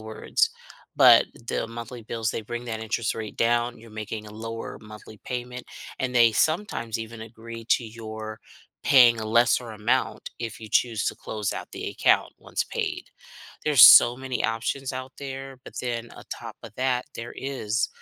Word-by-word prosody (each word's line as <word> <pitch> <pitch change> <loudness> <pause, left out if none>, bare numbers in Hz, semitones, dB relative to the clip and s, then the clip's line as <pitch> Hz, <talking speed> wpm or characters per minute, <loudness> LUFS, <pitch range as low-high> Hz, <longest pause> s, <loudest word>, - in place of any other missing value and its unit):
words. 110 - 0 0.5
But 120 -2 +8 0.2
the - - -1
monthly 115 +1 -8
bills, 110 0 -2
they - - -4
bring 120 +3 -5
that 110 -2 -4
interest 110 0 -1
rate 110 -1 -6
down, 120 +1 +1
you're 115 +1 -14
making 110 0 -6
a 105 - -11
lower 115 +1 -6
monthly 105 0 -12
payment, 125 0 -5 0.4
and 125 -1 -2
they 120 -2 +6
sometimes 155 - 0
even 115 0 -7
agree 115 0 -10
to 120 - +3
your 110 -1 -8 0.4
paying 120 -4 +7
a 110 - -4
lesser 120 +1 +3
amount 110 +5 -1
if 115 -2 -6
you 110 - -9
choose 115 -4 +2
to - - -1
close 105 -2 -3
out - - -6
the - - -5
account - - +2
once - - -2
paid. - - -3 0.6
There's 150 -6 +6
so 120 +1 +10
many 130 -1 -3
options 115 +4 -1
out 130 0 -6
there, 135 -1 -7
but - - -12
then 120 -1 -3
on - - -13
top - - -7
of 115 - -10
that, 125 -1 0
there 115 +1 -7
is 115 -5 -1
115 Hz, 175 wpm, -25 LUFS, 110-125 Hz, 0.6 s, so